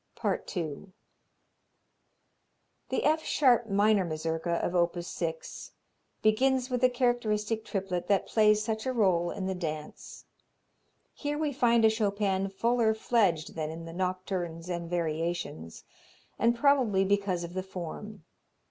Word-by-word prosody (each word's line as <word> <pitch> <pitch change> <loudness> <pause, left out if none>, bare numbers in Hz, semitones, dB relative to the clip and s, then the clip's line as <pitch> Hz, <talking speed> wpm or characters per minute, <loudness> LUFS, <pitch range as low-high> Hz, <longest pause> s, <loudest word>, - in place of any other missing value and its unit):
II 175 +1 -3 2.0
The - - -1
F 315 +1 +2
sharp 240 -5 +3
minor 205 0 +3
Mazurka 165 +1 -2
of 175 - -2
op. 175 0 +2
6 165 -2 -5 0.5
begins 255 +4 +2
with 250 -1 0
the 255 - +5
characteristic 225 -3 0
triplet 195 -5 -3
that 200 -1 +2
plays 215 -1 +3
such 220 +2 -3
a 260 - 0
role 185 -7 +2
in 190 - -4
the 190 - -1
dance. 155 -4 -6 0.9
Here 290 0 -3
we 300 -2 -1
find 235 -3 +3
a - - +7
Chopin 200 -3 0
fuller 230 +2 +1
fledged 195 -9 +1
than 155 -1 -3
in 165 +1 -7
the 165 - -8
nocturnes 180 -2 -3
and 170 -1 -3
variations, 165 - -3 0.6
and 235 +2 +3
probably 240 -8 +3
because 195 -3 0
of 170 0 -7
the 185 - -2
form. 190 +2 -7
195 Hz, 130 wpm, -29 LUFS, 170-225 Hz, 2.0 s, a